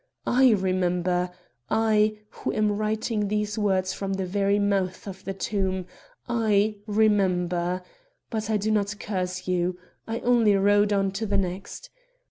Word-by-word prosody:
I 255 -1 +5
remember. 180 -2 0 0.4
I, 215 -1 +2
who - - -4
am 215 -1 +2
writing 215 0 -1
these 210 +1 -1
words 190 -2 +1
from 195 -1 -3
the 190 -1 -2
very 200 +2 +1
mouth 195 -2 0
of 190 -1 -8
the 195 - -3
tomb, 190 -2 -1 0.4
I 215 -3 +2
remember; 185 -4 +1 0.5
but 220 -2 -3
I 215 - +2
did 215 +2 0
not 205 -1 0
curse 185 -2 -3
you. 180 0 0 0.3
I 225 0 -2
only 235 -4 +4
rode 205 +1 +3
on 195 -1 +2
to 215 +3 -3
the 200 0 +1
next. 190 - -4
200 Hz, 145 wpm, -26 LUFS, 185-215 Hz, 0.5 s, I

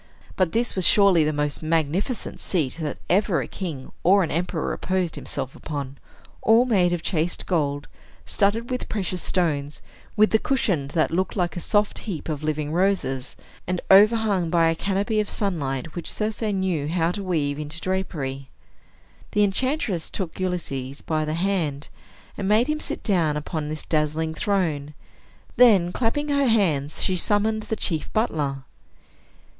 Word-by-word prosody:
But 185 -3 +1
this 240 +2 0
was 185 -2 +3
surely 195 -6 +5
the 155 - +1
most 150 -1 -1
magnificent 165 - -1
seat 155 -8 -1
that 150 - -3
ever 185 -3 +2
a - - -3
king 155 -9 -6
or 195 +2 +5
an 165 - -3
emperor 170 0 -1
reposed 185 -3 -1
himself 135 -2 -4
upon, 140 -3 -6 0.4
all 225 +3 +5
made 190 -8 +3
of 175 -2 -2
chased 170 -1 0
gold, 145 -5 -1 0.4
studded 225 +5 +1
with 250 - -3
precious 185 -3 -2
stones, 150 -5 -1 0.4
with 215 +1 +4
a 220 - +5
cushion 195 - 0
that 155 -1 +2
looked 185 +3 -1
like 180 -3 -1
a - - -3
soft 205 +4 +1
heap 175 -7 -5
of 150 -2 -3
living 155 -1 -2
roses, 175 -8 0 0.3
and 180 0 -1
overhung 205 -3 +5
by 165 -1 +3
a - - -1
canopy 200 +5 0
of 210 - -1
sunlight 150 - -2
which 175 - -2
Circe 215 +1 -3
knew 190 -8 0
how 165 +1 +1
to 200 - -4
weave 150 -6 -1
into 150 +2 -5
drapery. 145 -8 -3 0.8
The 210 - +4
enchantress 205 - 0
took 185 -3 -5
Ulysses 140 -7 -3
by 155 -1 -1
the 155 +1 -2
hand, 170 -6 -1 0.5
and 195 - -1
made 215 +4 +4
him 305 +2 -1
sit - - -4
down 165 -7 +2
upon 150 0 -4
this 155 0 -5
dazzling 155 +1 0
throne. 160 -6 -1 0.6
Then, 200 -8 +6
clapping 260 +8 -1
her 280 -1 +2
hands, 160 - +1
she 185 - +1
summoned 215 +3 +1
the 220 - -3
chief 165 -7 -2
butler. 150 - -1
175 Hz, 160 wpm, -24 LUFS, 150-205 Hz, 0.8 s, Then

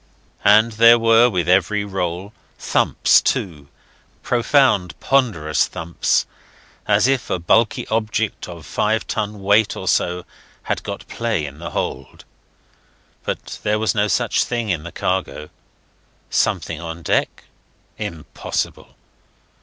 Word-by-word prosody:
And 110 +3 +5
there 115 +2 +6
were, 115 +1 +5
with 90 -6 -1
every 100 +3 +2
roll, 95 0 -4 0.2
thumps, - - +3
too 75 -7 -2 0.6
profound, 120 - +2
ponderous 100 - +1
thumps, 80 +1 -1 0.6
as 105 +3 +3
if 135 -2 0
a - - 0
bulky 95 +6 +2
object 110 -1 -1
of 85 -4 -10
five 110 +8 0
ton 105 -3 -4
weight 105 +2 +3
or 95 - -6
so 90 0 0 0.4
had - - -2
got - - -7
play 115 -9 -2
in 70 +1 -9
the 85 - -6
hold. 65 +1 -5 1.0
But - - -5
there 105 0 0
was 110 0 0
no 105 -1 +1
such 100 - +1
thing 120 -2 -3
in 85 -5 0
the 85 +2 -9
cargo. 90 -5 -3 0.8
Something 75 - 0
on 85 0 -7
deck? - - -1 0.6
Impossible. 80 -3 -5
100 Hz, 125 wpm, -20 LUFS, 85-110 Hz, 1.0 s, there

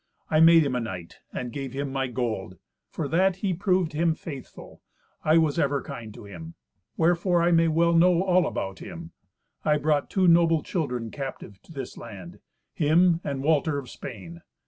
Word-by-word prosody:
I 155 - +4
made 165 0 +7
him 130 -3 -1
a - - +1
knight, 95 -7 -7
and 125 -1 -5
gave 135 -3 -5
him 140 0 -3
my 135 -1 -1
gold. 110 -7 -3 0.3
For 155 - -4
that 185 +5 +2
he 190 0 -1
proved 180 -2 0
him 160 +1 +1
faithful, 140 -6 -10 0.4
I 155 +1 +4
was 160 -1 +2
ever 140 -2 +1
kind 110 -2 -8
to - - -11
him. 85 -4 -10 0.4
Wherefore 175 +1 +2
I 175 - +3
may 165 -1 +4
well 170 +1 +3
know 175 +1 +4
all 185 -2 +3
about 95 0 -4
him. 170 -2 -9 0.5
I 150 -1 +3
brought 150 -1 0
two 190 -2 +2
noble 165 -2 +4
children 125 - -3
captive 135 -8 -7
to - - -18
this 135 -5 -7
land—him 150 - -1
and 135 -1 -3
Walter 155 0 +2
of 135 -3 -7
Spain. 90 -9 -9
150 Hz, 175 wpm, -26 LUFS, 125-170 Hz, 0.5 s, made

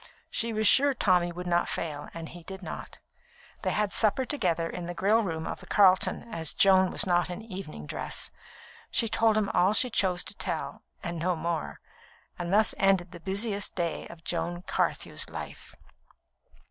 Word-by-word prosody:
She 230 0 +1
was 215 0 0
sure 280 +4 +5
that - - -34
Tommy 175 -1 +3
would 180 +1 -7
not 175 -1 +1
fail, 150 -3 -4
and 165 -1 -7
he 175 - -10
did 190 +3 -9
not. - - -7 0.6
They - - 0
had 210 -2 0
supper 225 +4 +3
together 175 - 0
in 170 0 -6
the 175 - -5
grill 210 +6 +3
room 160 -6 -3
of - - -4
the - - -14
Carlton, 190 -3 +4
as 160 -2 -1
Joan 190 -1 +5
was - - +1
not 175 -1 +2
in 180 +5 -6
evening 185 - -7
dress. - - -2 0.6
She 230 - +2
told 220 0 +3
him 215 -1 +1
all 190 +1 +3
she 250 +3 +2
chose 185 -4 +2
to - - -6
tell, - - -3 0.2
and 170 -1 -3
no 180 +2 +1
more; 170 -1 -3 0.6
and 175 0 -3
thus 215 +2 +4
ended 190 -2 +3
the 175 - -10
busiest 200 +3 -2
day 170 -2 -2
of 165 -1 -13
Joan 175 +1 -2
Carthew's - - -1
life. - - -8
185 Hz, 185 wpm, -28 LUFS, 170-205 Hz, 0.6 s, sure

